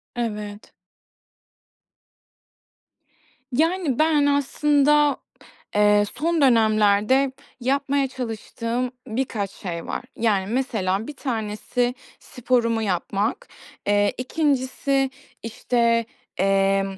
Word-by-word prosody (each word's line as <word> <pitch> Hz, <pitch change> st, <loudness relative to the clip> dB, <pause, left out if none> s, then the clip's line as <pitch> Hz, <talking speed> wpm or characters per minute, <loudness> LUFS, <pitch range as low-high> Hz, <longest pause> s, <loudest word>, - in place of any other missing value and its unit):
Evet. 210 Hz, -3 st, -5 dB, 2.8 s
Yani, 320 Hz, 0 st, +1 dB
ben 310 Hz, -2 st, +4 dB
aslında 290 Hz, 0 st, +3 dB, 0.6 s
eee, 210 Hz, 0 st, +5 dB
son 325 Hz, +5 st, 0 dB
dönemlerde 220 Hz, +1 st, +4 dB, 0.3 s
yapmaya 275 Hz, +2 st, +1 dB
çalıştığım 245 Hz, 0 st, -4 dB, 0.2 s
birkaç 220 Hz, -4 st, -2 dB
şey 170 Hz, -4 st, -6 dB
var. -, -, -4 dB
Yani, 205 Hz, -4 st, +1 dB
mesela 220 Hz, -6 st, -1 dB
1 295 Hz, -, -7 dB
tanesi 240 Hz, 0 st, -2 dB, 0.2 s
sporumu 235 Hz, -2 st, 0 dB
yapmak. 205 Hz, -, -1 dB, 0.4 s
Eee, 205 Hz, 0 st, +3 dB
2'ncisi, 270 Hz, -1 st, 0 dB, 0.3 s
işte, 230 Hz, 0 st, +1 dB, 0.3 s
emm, 195 Hz, 0 st, +1 dB
240 Hz, 80 wpm, -23 LUFS, 210-275 Hz, 2.8 s, eee